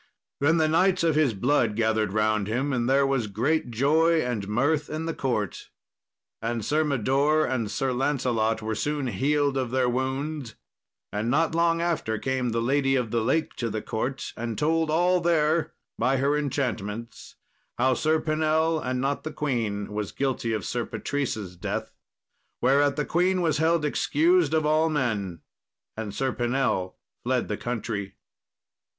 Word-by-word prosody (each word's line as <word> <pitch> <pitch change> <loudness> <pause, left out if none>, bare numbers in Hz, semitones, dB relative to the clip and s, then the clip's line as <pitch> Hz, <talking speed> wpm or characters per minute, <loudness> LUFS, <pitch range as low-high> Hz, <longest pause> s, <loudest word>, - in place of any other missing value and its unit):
Then 160 +4 +3
the 160 -1 +3
knights 185 +3 +3
of 165 -1 +3
his 145 -7 +2
blood 120 0 +1
gathered 110 -2 +1
round 105 -1 +1
him, 130 +6 -1
and 120 -1 0
there 135 +1 +4
was 135 -5 0
great 125 +9 0
joy 155 +8 +3
and 115 -5 -3
mirth 145 +8 +1
in 155 +1 -3
the 165 - -2
court. 110 - -2 0.7
And 115 -1 -2
Sir 155 +5 +2
Mador 140 +3 +2
and 120 -4 -1
Sir 130 +4 -1
Lancelot 120 -5 0
were 110 0 -2
soon 145 +5 -2
healed 140 +4 +1
of 130 -2 -1
their 130 0 +1
wounds; 130 +1 -2 0.6
and 105 +3 -1
not 160 +5 +2
long 170 0 +2
after 165 -10 -1
came 130 +1 -1
the 115 0 -1
Lady 135 +1 +2
of 125 -4 -1
the 115 - +1
Lake 140 +8 0
to 115 - -2
the 110 0 -4
court, 125 +5 -3
and 115 -1 -4
told 160 +1 +1
all 175 +3 +3
there 165 -1 +2 0.3
by 130 +3 +2
her 140 +3 +2
enchantments 115 -6 -3 0.4
how 130 +2 +3
Sir 155 +4 +1
Pinell, 155 +1 +1
and 130 0 -1
not 140 +1 -1
the 155 - -4
queen, 115 -9 -2
was 105 -2 -3
guilty 130 -4 -1
of 110 -3 -2
Sir 120 -1 -2
Patrice's 110 -12 -3
death. 90 - -4 0.7
Whereat 140 +2 +3
the 150 0 -1
queen 180 +1 +1
was 155 -3 +1
held 160 -1 +2
excused 335 - +2
of 155 -1 +1
all 155 +1 +3
men, 105 - -2 0.5
and 110 -2 -4
Sir 130 +5 -1
Pinell 120 -7 0 0.3
fled - - 0
the - - -1
country. 110 -4 -4
135 Hz, 165 wpm, -26 LUFS, 115-155 Hz, 0.7 s, there